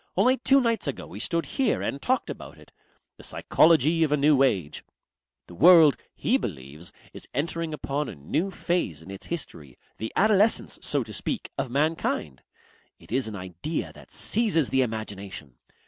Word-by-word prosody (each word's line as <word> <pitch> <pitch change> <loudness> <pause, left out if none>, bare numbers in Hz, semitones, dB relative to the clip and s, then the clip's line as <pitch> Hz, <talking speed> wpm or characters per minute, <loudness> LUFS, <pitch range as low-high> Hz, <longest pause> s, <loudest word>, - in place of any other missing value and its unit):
Only 255 +1 +4
two 270 +2 +4
nights 230 - 0
ago 140 - -4
we 100 - -9
stood 165 +8 -1
here 265 -5 0
and 140 - -3
talked 260 +1 0
about - - -10
it. - - -18 0.5
The - - -14
Psychology 160 0 +3
of 155 - +1
a 150 - +3
New 145 -1 +4
Age. 95 - +1 0.6
The - - -13
world, 160 - +7 0.2
he 255 - +2
believes, 75 - -6 0.2
is - - -8
entering 165 +3 -2
upon 145 -1 -3
a - - -8
new 145 - -2
phase 170 - -2
in 95 - -10
its 95 - -8
history, 75 - -5 0.2
the 110 - -4
adolescence, 215 +1 +3
so 140 -3 +1
to 110 -1 -10
speak, - - -3
of 135 -2 -2
mankind. 140 - -1 0.6
It - - -17
is 130 0 +1
an 110 - -6
idea 95 - -5
that - - -16
seizes 205 - +1
the 135 - +3
imagination. 100 - -5
140 Hz, 170 wpm, -26 LUFS, -, 0.6 s, world